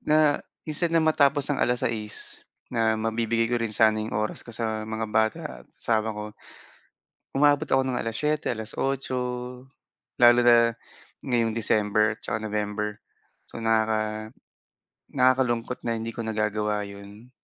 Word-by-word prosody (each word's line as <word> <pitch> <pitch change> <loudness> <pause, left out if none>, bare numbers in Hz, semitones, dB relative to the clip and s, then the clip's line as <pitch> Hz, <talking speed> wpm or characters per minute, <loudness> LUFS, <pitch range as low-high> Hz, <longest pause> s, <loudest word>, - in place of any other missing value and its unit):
na 150 -1 +3 0.2
instead 155 +2 0
na, 160 - +3
matapos 145 -2 +3
ng 140 - -2
6:00 115 -3 -1 0.3
na, 115 -2 +2
mabibigay 115 +1 0
ko 120 - +1
rin 110 -2 -2
sana 110 -1 +4
'yong 110 -1 -3
oras 105 0 -1
ko - - -12
sa 110 -1 -3
mga 110 0 -3
bata 110 +8 +2 0.2
at - - -18
asawa 110 -2 0
ko 105 - -4 1.1
umabot 145 +2 +3
ako 135 - +3
ng 130 -2 -2
7:00, 150 +7 -1
8:00. 130 +4 -2 1.0
Lalo 120 0 +7
na, 115 -1 +5 0.5
ngayong 115 -3 +1
December, 105 -1 +3
tsaka - - -2
November. 105 -1 -3 0.5
So, - - -8
nakaka 110 -1 0 0.8
nakakalungkot 125 -2 +1
na 115 - 0
hindi 115 +1 -4
ko - - -5
nagagawa 105 -1 -1
'yon. 100 +4 -12
115 Hz, 135 wpm, -26 LUFS, 110-125 Hz, 1.1 s, Lalo